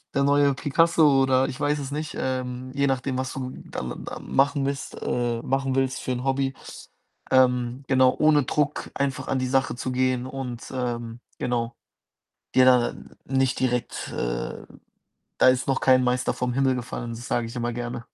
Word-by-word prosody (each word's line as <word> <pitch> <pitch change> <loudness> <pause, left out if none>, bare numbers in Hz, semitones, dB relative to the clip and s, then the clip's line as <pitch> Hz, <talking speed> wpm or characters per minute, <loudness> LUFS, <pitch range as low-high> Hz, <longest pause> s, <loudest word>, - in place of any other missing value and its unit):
der 140 - +3
neue 140 -1 +4
Picasso 150 -1 +4
oder 130 0 +3
ich 130 - -6
weiß 145 0 +1
es 140 0 -5
nicht. 150 +1 -4
Ähm, 130 0 -3
je 140 0 +1
nachdem, 130 0 -1
was 130 0 -3
du 130 -1 -4
da - - -5
da 60 - -6
machen 140 0 +1
willst 140 0 -4
äh, 120 -1 -1
machen 135 0 0
willst 135 0 0
für 130 - -3
'n 125 +1 -4
Hobby. 135 0 0 0.8
Ähm, 125 0 +3
genau, 130 -1 +4
ohne 155 -2 +5
Druck 145 +2 -1
einfach 140 -1 -2
an 135 - +1
die 130 - -1
Sache 130 -1 +1
zu 130 +1 -4
gehen 130 0 +1
und, 130 -3 -6
ähm, 120 -2 -3 0.2
genau 120 -1 -1 0.8
dir 130 - +6
da 125 -2 +4 0.3
nicht 130 -1 +1
direkt, 125 -2 -1
äh - - -3 0.8
da - - +6
ist 130 0 +1
noch 135 - +1
kein 130 -1 +5
Meister 125 0 +1
vom 125 -1 -1
Himmel 135 -1 +2
gefallen. 120 -1 -5
Das 115 +2 -7
sage 120 -1 0
ich 115 - -9
immer 120 0 -2
gerne. 120 0 -4
130 Hz, 180 wpm, -25 LUFS, 125-135 Hz, 0.8 s, dir